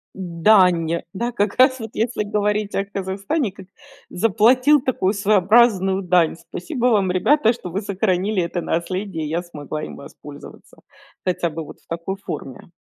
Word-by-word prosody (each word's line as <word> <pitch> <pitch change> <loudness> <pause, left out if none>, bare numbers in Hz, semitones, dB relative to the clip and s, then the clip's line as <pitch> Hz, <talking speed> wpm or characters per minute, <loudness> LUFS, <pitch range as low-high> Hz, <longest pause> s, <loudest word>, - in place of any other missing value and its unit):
Дань, 180 -2 +3 0.2
да, 235 +5 -2
как 205 -3 -1
раз 260 0 +5
вот 220 -1 -7
если 225 -1 -1
говорить 210 0 -1
о 195 - +1
Казахстане, 200 - -3
как 190 -2 -13 0.4
заплатил 245 +8 +3
такую 215 -7 0
своеобразную 200 -1 +3
дань. 175 -3 +2
Спасибо 230 - -4
вам, 200 -6 +2
ребята, 225 +6 +3
что 230 -6 -8
вы 190 +5 -3
сохранили- 195 0 0
это 170 +1 -3
наследие, 175 0 -3
и 150 - -5
я 170 +2 -1
смогла 155 -3 -7
им - - -7
воспользоваться, 145 +1 -13 0.5
хотя 175 -2 0
бы 160 +1 -6
вот - - -12
в - - -33
такой 170 +4 -4
форме. 150 -5 -8
195 Hz, 155 wpm, -21 LUFS, 175-220 Hz, 0.5 s, раз